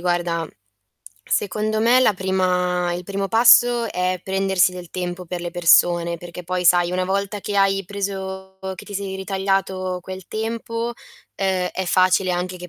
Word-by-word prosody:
guarda, 175 -2 -1 0.8
secondo 215 +2 -1
me 235 +3 +5
la 215 -6 +3
prima 180 -1 0
il 175 - -4
primo 195 +1 -3
passo 240 0 +5
è 180 0 -1
prendersi 190 -1 +2
del 180 -1 -9
tempo 180 0 -5
per 175 +1 -5
le 175 0 -5
persone, 170 0 +4
perché 175 +1 -10
poi 180 +1 -2
sai 175 0 +4
una 185 0 0
volta 200 +2 -2
che 205 +1 -4
hai 195 0 +2
preso 190 -1 -5 0.2
che - - -10
ti 205 - -10
sei 195 -1 -4
ritagliato 190 -1 -2
quel 185 0 -9
tempo, 230 +1 -3 0.4
ehm, 190 -2 -1
è 190 - -3
facile 185 +1 +3
anche 180 +1 -3
che 180 0 -9
190 Hz, 160 wpm, -21 LUFS, 180-200 Hz, 0.8 s, me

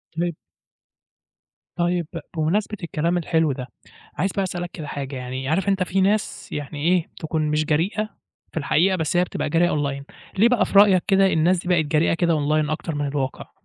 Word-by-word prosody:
طيب 170 -1 -2 1.4
طيب 175 -1 0 0.3
بمناسبة 200 +7 0
الكلام 170 +1 0
الحلو 160 -2 +1
ده، 130 -1 -5 0.5
عايز 190 +2 0
بقى 195 - -1
أسألك 175 -1 -4
كده 155 -4 -7
حاجة 140 -1 -5
يعني، 130 +1 -5
عارف 190 +5 +1
أنت 195 -2 +2
في 190 +2 0
ناس 205 +2 0
يعني 145 0 -5
إيه 180 -2 +2
تكون 160 0 -2
مش 155 0 +1
جريئة 185 +8 0 0.4
في - - -10
الحقيقة، 165 +5 +2
بس 160 +1 -1
هي 180 - +4
بتبقى 175 - -3
جريئة 170 +2 +3
online 140 -2 -2 0.4
ليه 230 +3 +6
بقى 245 -3 +3
في 200 - +4
رأيك 195 -3 +6
كده 195 -1 +4
الناس 175 +1 +2
دي 175 - -8
بقت 170 -4 +3
جريئة 155 +2 +2
كده 170 0 +2
online 150 0 +1
أكتر 155 0 -3
من 145 0 -1
الواقع؟ 135 - -4
165 Hz, 185 wpm, -23 LUFS, 150-185 Hz, 1.4 s, ليه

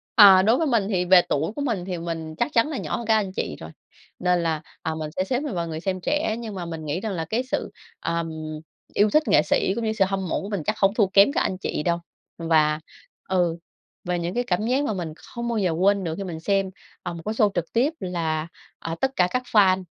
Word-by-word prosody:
À, 200 -5 +9
đối 220 +6 +4
với 320 - +1
mình 230 -7 +2
thì 180 -4 +1
về 180 0 +7
tuổi 155 +6 0
của - - -4
mình 225 -10 -1
thì 185 -2 -3
mình 165 -2 -5
chắc 240 - -1
chắn 230 +4 +4
là 300 - -3
nhỏ - - -3
hơn 235 - -6
các 220 - +4
anh 200 -3 -1
chị 75 - -3
rồi, 80 - -8 0.5
nên 180 -1 +2
là, 160 -2 -1 0.2
à, 160 - -2
mình 155 -1 -4
sẽ 185 - +1
xếp 250 +6 -1
mình 290 -4 -4
vào 170 -1 -2
người 160 -1 -4
xem 185 +1 -2
trẻ. 295 - 0
Nhưng 220 -3 -6
mà 180 -2 -4
mình 165 -2 -6
nghĩ 150 +3 -2
rằng 215 +2 -3
là 165 -3 -3
cái 225 +9 -1
sự, 260 - -3 0.3
ờm, 170 0 -2 0.6
yêu 210 +1 +4
thích 305 +9 +4
nghệ - - +5
sĩ 175 +4 +1
cũng 235 - -3
như 220 - 0
sự 205 -3 +3
hâm 190 -1 -2
mộ - - -1
của 195 - -6
mình 200 -6 -2
chắc 215 0 -1
hổng 195 0 +4
thua 215 -3 +3
kém 200 +6 +5
các - - 0
anh 185 - -1
chị 165 - -3
đâu. 170 0 +1 0.4
Và, 155 -2 +2 0.5
ừ, 175 -3 +1 0.5
về 180 0 -1
những 170 +1 -3
cái 245 - 0
cảm 210 0 -1
giác 260 +4 +2
mà 225 - -1
mình 170 -5 -4
không 235 +7 -7
bao 235 -1 -1
giờ 190 -5 +1
quên 195 +4 +2
được 160 -2 -3
khi 200 - -4
mình 170 -4 -6
xem, 195 +2 +1 0.3
à, 175 - -4
một 170 - -7
cái 215 - -1
show 220 -2 +3
trực 175 -2 -3
tiếp, 260 +7 +2
là, 165 -3 -2 0.3
ờ, 165 0 -4
tất 265 - +2
cả 180 - +3
các 250 0 0
fan, 190 -3 +5
190 Hz, 265 wpm, -24 LUFS, 170-220 Hz, 0.6 s, À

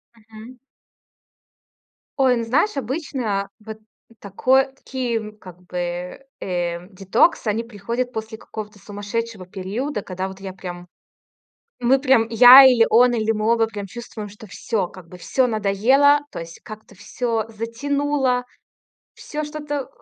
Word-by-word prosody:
Мгм. 225 +2 -14 1.6
Ой, 260 -2 +4
ну, 235 - -2
знаешь, 295 - +1
обычно 255 -7 -2 0.2
вот 220 0 -8 0.4
такой 255 +7 +2
такие, 235 -5 -4
как 180 -4 -14
бы, 180 +5 -5
э, 175 -1 -3
детокс, 205 - +1
они 220 +1 0
приходят 235 +3 -4
после 220 -1 -6
какого-то 210 -2 -9
сумасшедшего 205 +1 -5
периода, 210 +8 -4
когда 185 0 -5
вот 190 0 -10
я 195 -1 -7
прям, 180 -1 -8 0.9
мы 250 +2 +4
прям, 260 -5 +3
я, 245 +4 +10
или 245 -4 +6
он, 245 +2 +5
или 225 -1 +1
мы 215 +1 +1
оба 230 -1 +2
прям 205 -2 -7
чувствуем, 220 0 -8
что 210 +2 -13
всё, 205 0 -2
как 175 -1 -14
бы, 180 - -12
всё 255 +8 +1
надоело, 235 +7 +3
то - - -7
есть 165 0 -9
как-то 215 -1 -12
всё 220 +3 -3
затянуло, 255 +3 -1 0.7
всё 305 0 -5
что-то 295 -2 -5
225 Hz, 135 wpm, -21 LUFS, 200-255 Hz, 1.6 s, я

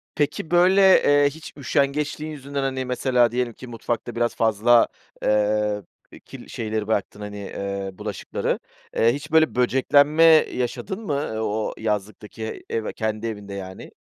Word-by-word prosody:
Peki, 150 +2 -1
böyle, 190 +2 +6
eee, 145 0 +4
hiç 155 +2 -11
üşengeçliğin 150 +3 -1
yüzünden, 140 -1 -5
hani, 130 -1 -2
mesela 125 -2 +2
diyelim 125 -1 -1
ki 130 - -11
mutfakta 120 0 -4
biraz 120 0 0
fazla, 115 +2 +4 0.4
eee, 105 -1 +1 0.4
kirli - - -11
şeyleri 110 -2 -3
bıraktın, 105 -1 -2
hani, 105 0 -6
eee, 100 -1 -4
bulaşıkları. 105 0 -3 0.4
Eee, 115 +1 +4
hiç 145 +2 -7
böyle 160 -4 +4
böceklenme 145 +5 +3 0.3
yaşadın 190 - -3
mı 145 - -1 0.3
o 110 0 -2
yazlıktaki 105 +1 -4
ev 110 -1 -2
kendi 110 +1 -2
evinde 105 -2 -6
yani? 95 -1 -8
120 Hz, 135 wpm, -23 LUFS, 105-140 Hz, 0.4 s, böyle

